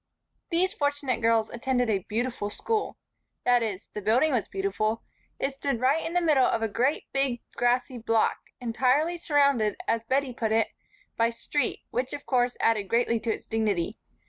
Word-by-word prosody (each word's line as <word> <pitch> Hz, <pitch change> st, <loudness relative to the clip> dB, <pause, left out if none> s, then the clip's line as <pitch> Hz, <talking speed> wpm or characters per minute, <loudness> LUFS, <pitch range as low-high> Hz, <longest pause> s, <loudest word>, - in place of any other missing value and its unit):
These 370 Hz, +2 st, +1 dB
fortunate 285 Hz, -4 st, -1 dB
girls 225 Hz, -1 st, +2 dB
attended 245 Hz, 0 st, 0 dB
a 210 Hz, -3 st, +2 dB
beautiful 230 Hz, -1 st, -1 dB
school. 435 Hz, -, -2 dB, 0.5 s
That 245 Hz, -1 st, +4 dB
is, 205 Hz, -4 st, -3 dB
the 210 Hz, -, -4 dB
building 245 Hz, +10 st, +3 dB
was 240 Hz, -6 st, 0 dB
beautiful. 200 Hz, +3 st, -1 dB, 0.3 s
It 275 Hz, -, -1 dB
stood 275 Hz, -3 st, -2 dB
right 275 Hz, +6 st, +2 dB
in 330 Hz, -, -4 dB
the 355 Hz, -, +3 dB
middle 295 Hz, -6 st, +4 dB
of 225 Hz, -, 0 dB
a -, -, +2 dB
great 250 Hz, +8 st, 0 dB
big 270 Hz, -3 st, +1 dB, 0.2 s
grassy 245 Hz, +1 st, +1 dB
block, 225 Hz, -1 st, +1 dB, 0.2 s
entirely 260 Hz, +8 st, +1 dB
surrounded, 280 Hz, -9 st, +2 dB
as 230 Hz, 0 st, +1 dB
Bettie 265 Hz, +1 st, 0 dB
put 225 Hz, -2 st, -2 dB
it, 225 Hz, 0 st, +2 dB, 0.5 s
by 230 Hz, 0 st, +3 dB
street, 265 Hz, +5 st, -2 dB
which 250 Hz, +2 st, -2 dB
of 290 Hz, -1 st, -6 dB
course 245 Hz, -1 st, +1 dB
added 215 Hz, -3 st, +2 dB
greatly 235 Hz, +1 st, +2 dB
to 225 Hz, 0 st, -1 dB
its -, -, -5 dB
dignity. 210 Hz, -3 st, -1 dB
245 Hz, 170 wpm, -27 LUFS, 225-275 Hz, 0.5 s, That